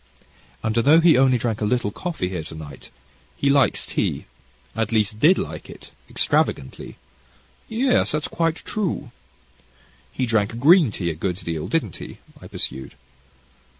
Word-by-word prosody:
"And 110 Hz, 0 st, -1 dB
although 145 Hz, +8 st, +6 dB
he 165 Hz, -1 st, +6 dB
only 130 Hz, -1 st, +4 dB
drank 115 Hz, -2 st, -2 dB
a -, -, +1 dB
little 120 Hz, -2 st, 0 dB
coffee 165 Hz, -, -4 dB
here 90 Hz, -3 st, -4 dB
to 80 Hz, -, -9 dB
night, 75 Hz, -4 st, -10 dB, 0.5 s
he 140 Hz, -, +2 dB
likes 140 Hz, -1 st, +2 dB
tea, -, -, -2 dB, 0.5 s
at 115 Hz, -1 st, -1 dB
least, 105 Hz, -1 st, 0 dB
did 170 Hz, +8 st, +5 dB
like -, -, -5 dB
it -, -, -12 dB, 0.2 s
extravagantly." 65 Hz, -, -1 dB, 0.7 s
"Yes, 250 Hz, +3 st, +2 dB
that's 150 Hz, 0 st, -1 dB
quite 165 Hz, -1 st, 0 dB
true." 180 Hz, -, -3 dB, 1.0 s
"He 130 Hz, -, -1 dB
drank 110 Hz, 0 st, 0 dB
green 155 Hz, +3 st, +6 dB
tea, 85 Hz, -4 st, -2 dB
a -, -, -4 dB
good 90 Hz, +3 st, -2 dB
deal, 80 Hz, -4 st, -4 dB
didn't 145 Hz, -, -1 dB
he?" -, -, -9 dB, 0.2 s
I -, -, -10 dB
pursued. 65 Hz, 0 st, -4 dB
120 Hz, 150 wpm, -22 LUFS, 100-155 Hz, 1.0 s, although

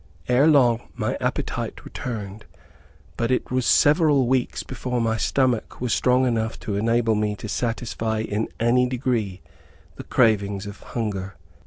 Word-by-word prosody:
Ere 130 Hz, +5 st, +4 dB
long, 125 Hz, -6 st, +3 dB
my -, -, -1 dB
appetite -, -, -3 dB
returned, 105 Hz, -4 st, -6 dB, 0.7 s
but 115 Hz, 0 st, 0 dB
it 130 Hz, -, 0 dB
was 130 Hz, -1 st, 0 dB
several 145 Hz, -3 st, +4 dB
weeks 130 Hz, 0 st, 0 dB
before 125 Hz, -1 st, -3 dB
my 115 Hz, -1 st, +1 dB
stomach 125 Hz, 0 st, 0 dB
was 125 Hz, -2 st, -1 dB
strong 125 Hz, +1 st, +3 dB
enough 115 Hz, -2 st, -1 dB
to 105 Hz, -, -4 dB
enable 115 Hz, +2 st, +2 dB
me 105 Hz, -1 st, 0 dB
to 105 Hz, +2 st, -8 dB
satisfy 115 Hz, -1 st, -2 dB
in 110 Hz, 0 st, -2 dB
any 125 Hz, +2 st, +3 dB
degree, 120 Hz, -7 st, -2 dB, 0.6 s
the -, -, -7 dB
cravings 100 Hz, -3 st, +1 dB
of 100 Hz, 0 st, -8 dB
hunger. 100 Hz, -5 st, -4 dB
115 Hz, 145 wpm, -23 LUFS, 105-125 Hz, 0.7 s, Ere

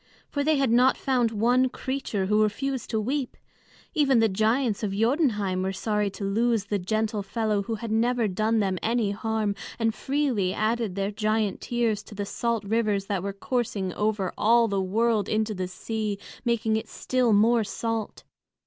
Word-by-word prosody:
For 285 Hz, -, 0 dB
they 310 Hz, +1 st, +3 dB
had 270 Hz, -4 st, +2 dB
not 250 Hz, +3 st, +4 dB
found 250 Hz, -3 st, +1 dB
one 245 Hz, +4 st, +2 dB
creature 260 Hz, -7 st, -3 dB
who 210 Hz, +2 st, +3 dB
refused 255 Hz, +4 st, -1 dB
to 220 Hz, -, 0 dB
weep. 260 Hz, +4 st, -2 dB, 0.6 s
Even 275 Hz, -4 st, +3 dB
the 225 Hz, -1 st, +5 dB
giants 220 Hz, +3 st, +1 dB
of 205 Hz, -3 st, -2 dB
Jotunheim 215 Hz, -, +1 dB
were 190 Hz, +1 st, -1 dB
sorry 210 Hz, +1 st, -1 dB
to 195 Hz, -, -8 dB
lose 225 Hz, +1 st, +1 dB
the 205 Hz, 0 st, -1 dB
gentle 215 Hz, +3 st, -1 dB
fellow 210 Hz, +1 st, -1 dB
who 225 Hz, +3 st, -3 dB
had 220 Hz, +1 st, -6 dB
never 235 Hz, +1 st, +2 dB
done 215 Hz, +3 st, +1 dB
them 190 Hz, -3 st, -1 dB
any 225 Hz, -2 st, +1 dB
harm, 215 Hz, 0 st, -1 dB, 0.2 s
and 225 Hz, -1 st, +1 dB
freely 260 Hz, -11 st, 0 dB
added 220 Hz, -2 st, 0 dB
their 195 Hz, +1 st, -1 dB
giant 215 Hz, -1 st, 0 dB
tears 230 Hz, -4 st, 0 dB
to 210 Hz, -, -11 dB
the 205 Hz, 0 st, -3 dB
salt 230 Hz, +1 st, -1 dB
rivers 210 Hz, -1 st, 0 dB
that 195 Hz, -2 st, -2 dB
were 200 Hz, +2 st, -3 dB
coursing 200 Hz, -3 st, -2 dB
over 210 Hz, -3 st, -1 dB
all 230 Hz, +2 st, +5 dB
the 200 Hz, -2 st, 0 dB
world 215 Hz, +2 st, +1 dB
into 215 Hz, 0 st, 0 dB
the 185 Hz, -2 st, -3 dB
sea, 210 Hz, +2 st, -3 dB, 0.3 s
making 230 Hz, -2 st, +1 dB
it 220 Hz, -, -5 dB
still 255 Hz, -2 st, 0 dB
more 225 Hz, +3 st, +4 dB
salt. 225 Hz, +1 st, -4 dB
220 Hz, 175 wpm, -26 LUFS, 205-235 Hz, 0.6 s, the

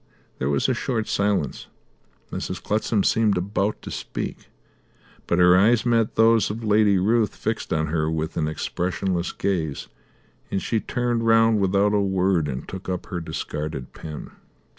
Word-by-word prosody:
There 65 Hz, -, 0 dB
was 70 Hz, -1 st, +1 dB
a -, -, +2 dB
short 115 Hz, -5 st, -2 dB
silence; 100 Hz, 0 st, -1 dB, 0.6 s
Mrs. -, -, -4 dB
Clutsam 105 Hz, -1 st, 0 dB
seemed 110 Hz, -4 st, +2 dB
about 100 Hz, +3 st, -1 dB
to -, -, -7 dB
speak, -, -, -5 dB, 0.8 s
but 85 Hz, -, +1 dB
her 90 Hz, 0 st, +6 dB
eyes 110 Hz, +5 st, +4 dB
met 115 Hz, -2 st, +2 dB
those 115 Hz, 0 st, +4 dB
of 110 Hz, +3 st, -5 dB
Lady 105 Hz, -2 st, +4 dB
Ruth 110 Hz, +3 st, +2 dB
fixed -, -, -3 dB
on 80 Hz, 0 st, +1 dB
her 80 Hz, 0 st, 0 dB
with 80 Hz, 0 st, -2 dB
an 75 Hz, -, 0 dB
expressionless 90 Hz, +3 st, -2 dB
gaze, 80 Hz, -8 st, -2 dB, 0.6 s
and 95 Hz, -, -1 dB
she 110 Hz, +3 st, -1 dB
turned 120 Hz, 0 st, -1 dB
round 115 Hz, -1 st, +5 dB
without 100 Hz, +2 st, +2 dB
a 105 Hz, -, +3 dB
word 95 Hz, -4 st, +1 dB
and 65 Hz, -2 st, -5 dB
took 95 Hz, 0 st, -7 dB
up 90 Hz, -1 st, -3 dB
her 85 Hz, -, -2 dB
discarded 75 Hz, -4 st, -5 dB
pen. 75 Hz, -2 st, -8 dB
95 Hz, 160 wpm, -24 LUFS, 85-110 Hz, 0.8 s, her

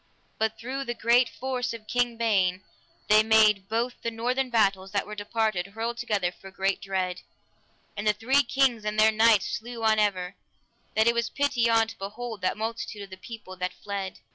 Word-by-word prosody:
But 220 Hz, 0 st, 0 dB
through 265 Hz, +4 st, -4 dB
the 240 Hz, -1 st, -3 dB
great 235 Hz, +2 st, +3 dB
force 255 Hz, -2 st, -3 dB
of 220 Hz, -2 st, -11 dB
King 245 Hz, -1 st, 0 dB
Ban 190 Hz, -5 st, +1 dB, 0.4 s
they 215 Hz, 0 st, +6 dB
made 215 Hz, -3 st, +4 dB
both 235 Hz, +2 st, -2 dB
the 230 Hz, -, -1 dB
northern 250 Hz, +3 st, -1 dB
battles 195 Hz, -5 st, +1 dB
that 200 Hz, -, 0 dB
were 210 Hz, -, -8 dB
departed 210 Hz, -2 st, -1 dB
hurtled 225 Hz, +3 st, -4 dB
together 205 Hz, -7 st, 0 dB
for 195 Hz, +2 st, -13 dB
great 195 Hz, 0 st, -1 dB
dread; 185 Hz, -2 st, -2 dB, 0.7 s
and 205 Hz, +1 st, -3 dB
the 210 Hz, -, +5 dB
three 250 Hz, +7 st, +3 dB
kings 265 Hz, -4 st, +1 dB
and 210 Hz, 0 st, -2 dB
their 220 Hz, +1 st, +6 dB
knights 220 Hz, -2 st, +4 dB
slew 235 Hz, 0 st, -8 dB
on 220 Hz, -1 st, +4 dB
ever, 190 Hz, -3 st, 0 dB, 0.6 s
that 220 Hz, 0 st, +4 dB
it 235 Hz, -, +4 dB
was 235 Hz, 0 st, 0 dB
pity 270 Hz, -5 st, +1 dB
on 225 Hz, -1 st, +4 dB
to 225 Hz, -, -10 dB
behold 215 Hz, +2 st, -6 dB
that 185 Hz, -, 0 dB
multitude 220 Hz, -1 st, -4 dB
of 195 Hz, -, -12 dB
the -, -, -7 dB
people 190 Hz, -1 st, -10 dB
that 180 Hz, 0 st, -3 dB
fled. 200 Hz, -2 st, -5 dB
220 Hz, 190 wpm, -27 LUFS, 200-235 Hz, 0.7 s, they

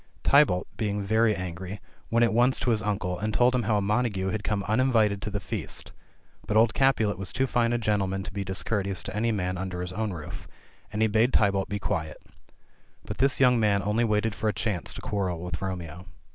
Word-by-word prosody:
Tybalt, 140 Hz, -11 st, +4 dB
being 105 Hz, -2 st, -1 dB
very 110 Hz, +1 st, +2 dB
angry, 95 Hz, +2 st, -6 dB, 0.3 s
went 115 Hz, +1 st, +3 dB
at 115 Hz, -, +2 dB
once 120 Hz, +3 st, +3 dB
to 125 Hz, -, +1 dB
his 110 Hz, -2 st, +1 dB
uncle, 100 Hz, -4 st, -2 dB
and 110 Hz, +2 st, -1 dB
told 120 Hz, +4 st, +3 dB
him 125 Hz, -, +2 dB
how 110 Hz, -1 st, +1 dB
a 100 Hz, -, 0 dB
Montagu 105 Hz, -2 st, 0 dB
had 105 Hz, 0 st, -3 dB
come 105 Hz, -2 st, -1 dB
uninvited 110 Hz, -4 st, +2 dB
to 105 Hz, -, -3 dB
the 100 Hz, 0 st, -3 dB
feast; -, -, -4 dB, 0.5 s
but 105 Hz, -, +1 dB
old 110 Hz, 0 st, +4 dB
Capulet 115 Hz, -8 st, +2 dB
was 95 Hz, -1 st, -4 dB
too 130 Hz, +2 st, +1 dB
fine 120 Hz, -2 st, +1 dB
a 120 Hz, -, +1 dB
gentleman 100 Hz, -4 st, 0 dB
to 95 Hz, -, -7 dB
be 100 Hz, 0 st, -3 dB
discourteous 95 Hz, 0 st, -2 dB
to 95 Hz, -, -6 dB
any 115 Hz, +2 st, +1 dB
man 90 Hz, -3 st, -2 dB
under 95 Hz, -2 st, -4 dB
his 90 Hz, 0 st, -4 dB
own 110 Hz, +1 st, -2 dB
roof, 80 Hz, -5 st, -8 dB, 0.4 s
and 105 Hz, +1 st, 0 dB
he -, -, +4 dB
bade 110 Hz, +4 st, +2 dB
Tybalt 100 Hz, -2 st, +2 dB
be 100 Hz, -, -2 dB
quiet. 80 Hz, -5 st, -3 dB, 0.9 s
But -, -, -6 dB
this 135 Hz, +1 st, +2 dB
young 125 Hz, -2 st, +5 dB
man 100 Hz, -2 st, +2 dB
only 105 Hz, +3 st, +1 dB
waited 110 Hz, -1 st, +1 dB
for 110 Hz, +1 st, -1 dB
a -, -, -1 dB
chance 95 Hz, -1 st, -2 dB
to -, -, -8 dB
quarrel 90 Hz, -5 st, -2 dB
with 90 Hz, -4 st, -5 dB
Romeo. 90 Hz, -2 st, -5 dB
105 Hz, 215 wpm, -27 LUFS, 95-115 Hz, 0.9 s, young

